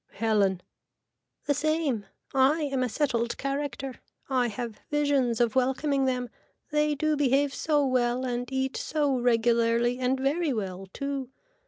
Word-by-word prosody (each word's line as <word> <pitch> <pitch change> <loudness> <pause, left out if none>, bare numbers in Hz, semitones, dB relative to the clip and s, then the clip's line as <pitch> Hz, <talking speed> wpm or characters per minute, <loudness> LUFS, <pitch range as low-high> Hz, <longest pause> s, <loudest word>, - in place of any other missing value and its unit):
(Helen.) 200 -4 +1 0.8
The 290 - +2
same. 290 -7 0 0.3
I 275 +4 +4
am 275 -3 -1
a 250 - 0
settled 235 -3 0
character. 275 -2 -4 0.3
I 250 -2 +2
have 230 0 -5
visions 285 -6 +1
of 235 -2 +2
welcoming 265 +2 +1
them. 250 -2 -1 0.4
They 300 0 +2
do 310 +2 +1
behave 280 0 +2
so 295 -2 +1
well 255 -1 +1
and 245 0 -3
eat 265 0 -1
so 290 -4 0
regularly 235 0 +2
and 255 +1 +1
very 290 +3 +1
well 195 -3 -4
too. 275 -1 -4
260 Hz, 140 wpm, -27 LUFS, 240-285 Hz, 0.8 s, I